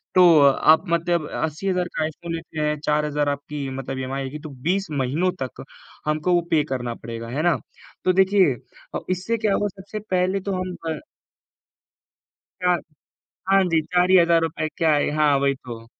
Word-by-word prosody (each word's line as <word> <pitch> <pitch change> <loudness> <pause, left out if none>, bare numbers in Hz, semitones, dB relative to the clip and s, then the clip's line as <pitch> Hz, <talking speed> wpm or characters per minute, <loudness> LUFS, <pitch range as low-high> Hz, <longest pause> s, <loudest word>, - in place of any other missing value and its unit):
तो 185 - +7 0.2
अ 140 -1 +7 0.2
आप 160 +3 +7
मतलब 170 -1 +1
80,000 180 +3 -1
का 155 - 0
आईफ़ोन 165 +2 -5
लेते 165 -1 -6
हैं, 150 -1 0
4000 150 -1 +1
आपकी 140 0 -4
मतलब 135 0 -5
ईएमआई 135 +1 -3
आएगी, 140 +3 -6
तो 155 - -9
20 170 +9 -1
महीनों 145 +6 0
तक 130 0 -5 0.4
हमको 155 +4 +1
वो 175 - +4
पे 155 -2 +4
करना 120 -2 -2
पड़ेगा, 115 0 -7
है 140 +5 -2
ना? 175 -3 +4 0.5
तो 185 - +4
देखिए 190 -5 +4 0.4
अ, - - 0
इससे 190 +6 -1
क्या 210 -2 +1
होगा 205 - +1
सबसे 200 +3 -6
पहले 185 +1 +1
तो - - 0
हम 185 -1 -4 0.2
अ - - -4 1.6
4 180 -1 +3 0.7
हाँ 195 0 +6
जी, 165 -1 +3
4 180 +3 +1
ही 190 - +7
हज़ार 170 -1 +5
रुपए 160 -1 -2
क्या 160 -2 +3
है? 145 - +2
हाँ, 150 -2 +4
वही 140 0 +2
तो। 120 -3 -10
160 Hz, 180 wpm, -23 LUFS, 140-180 Hz, 1.6 s, तो